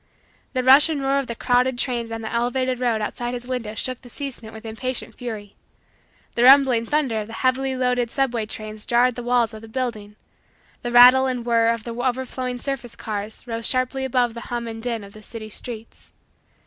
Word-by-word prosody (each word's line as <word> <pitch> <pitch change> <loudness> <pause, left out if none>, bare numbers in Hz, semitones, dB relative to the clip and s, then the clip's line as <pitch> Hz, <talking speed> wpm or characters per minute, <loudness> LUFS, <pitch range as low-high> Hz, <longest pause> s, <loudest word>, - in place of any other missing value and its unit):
The 255 -1 0
rush 270 +5 +7
and 310 -3 -1
roar 275 0 +1
of 275 - -4
the 235 - -4
crowded 250 +1 +2
trains 240 -2 -2
on 225 0 -4
the 220 - -5
elevated 250 +2 0
road 235 -3 +1
outside 240 +3 -3
his 245 0 -6
window 245 -4 -4
shook 255 +3 -3
the 245 - -13
casement 240 -4 -7
with 220 0 -11
impatient 225 +1 -4
fury. 215 -5 -7 0.8
The 235 - +1
rumbling 260 -3 +6
thunder 265 -7 +1
of 210 - -7
the 225 - -10
heavily 260 +2 0
loaded 250 -2 +1
subway 240 -4 0
trains 215 0 -7
jarred 245 +1 +4
the 245 - -6
walls 240 -1 +2
of 215 - -9
the 225 - -11
building. 220 -4 -4 0.7
The 240 - -3
rattle 250 +2 +8
and 250 -2 -3
whirr 230 -1 +3
of 230 -1 -1
the 235 - -5
overflowing 255 +1 -2
surface 245 -2 -5
cars 215 0 -5
rose 230 -2 -2
sharply 255 +1 0
above 250 -2 +1
the 235 - -7
hum 240 -1 -3
and 225 0 -6
din 230 -2 -3
of 200 0 -12
the 215 - -12
city 220 0 -8
streets. 230 +1 -9
240 Hz, 200 wpm, -23 LUFS, 225-255 Hz, 0.8 s, rattle